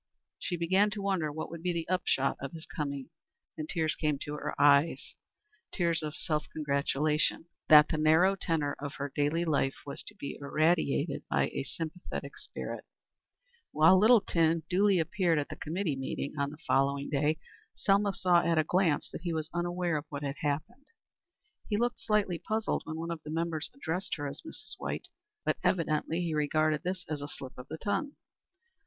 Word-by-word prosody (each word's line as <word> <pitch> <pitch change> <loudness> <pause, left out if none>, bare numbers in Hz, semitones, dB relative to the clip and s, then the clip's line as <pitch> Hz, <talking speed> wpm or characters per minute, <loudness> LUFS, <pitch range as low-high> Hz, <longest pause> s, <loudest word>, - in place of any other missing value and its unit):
She 175 - -2
began 190 +5 +3
to - - -3
wonder 185 -6 0
what 155 +2 -5
would 170 -1 -7
be 180 +1 0
the 165 -1 -3
upshot 180 -7 +1
of 140 +2 -5
his 160 -1 -7
coming, 140 -1 -4 0.4
and 155 -1 -5
tears 160 -2 +1
came 150 -2 0
to 145 - -5
her 150 - -4
eyes, 145 +2 +4 0.6
tears 170 -3 +1
of 155 -1 -4
self 150 -1 -2
congratulation 150 +1 +1 0.2
that 150 -1 +9
the 155 - -1
narrow 160 +5 +5
tenor 160 -6 -1
of 145 0 -5
her 140 0 -4
daily 150 +4 +1
life 140 -4 +1
was 140 - -5
to 210 - -9
be 140 -9 -6
irradiated 155 0 +1
by - - +2
a - - -3
sympathetic 165 +5 -6
spirit. - - -6 0.9
When 155 +3 +7
Littleton 170 -7 +4
duly 195 +2 +3
appeared 170 0 +1
at 145 - -1
the - - -6
committee 165 -1 -2
meeting 135 +1 -4
on 140 -1 0
the 150 - -10
following 140 +1 +2
day, 150 +2 +2 0.4
Selma 200 +1 +3
saw 180 -2 +3
at 170 -1 +1
a 155 - +5
glance 175 -1 +2
that - - -7
he 170 -1 -2
was 160 0 -3
unaware 175 -1 0
of 150 - -5
what 145 -1 -5
had 140 0 -3
happened. 220 - -3 0.8
He 205 - +1
looked 240 +1 0
slightly 210 -6 +1
puzzled 220 +6 -1
when 160 0 -5
one 165 +1 -4
of 165 -2 -5
the 150 - -9
members 165 0 -1
addressed 185 -7 -2
her 145 - -5
as 140 - -7
Mrs. 320 - -8
White, - - -4 0.4
but - - +1
evidently 165 -1 +1
he 165 -2 -1
regarded 155 0 +2
this 185 0 -3
as 150 -2 -3
a 145 - -4
slip 135 -2 -8
of 125 - -10
the 160 - -6
tongue. 230 - -1
160 Hz, 185 wpm, -30 LUFS, 150-180 Hz, 0.9 s, that